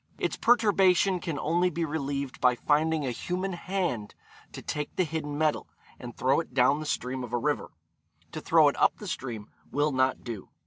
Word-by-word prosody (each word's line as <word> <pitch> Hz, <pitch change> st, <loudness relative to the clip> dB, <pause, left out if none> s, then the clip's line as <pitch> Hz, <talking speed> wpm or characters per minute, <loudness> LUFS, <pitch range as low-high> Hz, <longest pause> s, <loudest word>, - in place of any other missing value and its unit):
Its -, -, -1 dB
perturbation 195 Hz, -5 st, +3 dB
can 165 Hz, -4 st, -4 dB
only 175 Hz, +5 st, +1 dB
be 170 Hz, -1 st, -2 dB
relieved 140 Hz, -3 st, -3 dB
by 125 Hz, -1 st, +4 dB
finding 150 Hz, +3 st, +1 dB
a 130 Hz, -, -1 dB
human 180 Hz, +9 st, -3 dB
hand 175 Hz, -, -3 dB, 0.4 s
to -, -, -8 dB
take 150 Hz, -1 st, -4 dB
the 185 Hz, -, +2 dB
hidden 150 Hz, -3 st, -4 dB
metal, 155 Hz, -1 st, 0 dB, 0.3 s
and 120 Hz, -1 st, -9 dB
throw 135 Hz, +4 st, +2 dB
it 160 Hz, -6 st, -7 dB
down 135 Hz, +3 st, +4 dB
the 155 Hz, -, -5 dB
stream 130 Hz, -2 st, -2 dB
of 120 Hz, -1 st, -8 dB
a -, -, +2 dB
river. 120 Hz, -, -1 dB, 0.6 s
To -, -, -6 dB
throw -, -, +5 dB
it -, -, +1 dB
up -, -, +3 dB
the -, -, -8 dB
stream, 115 Hz, -5 st, -5 dB, 0.2 s
will 145 Hz, +2 st, +1 dB
not 130 Hz, -1 st, +1 dB
do. 115 Hz, -6 st, -7 dB
150 Hz, 190 wpm, -28 LUFS, 130-175 Hz, 0.6 s, throw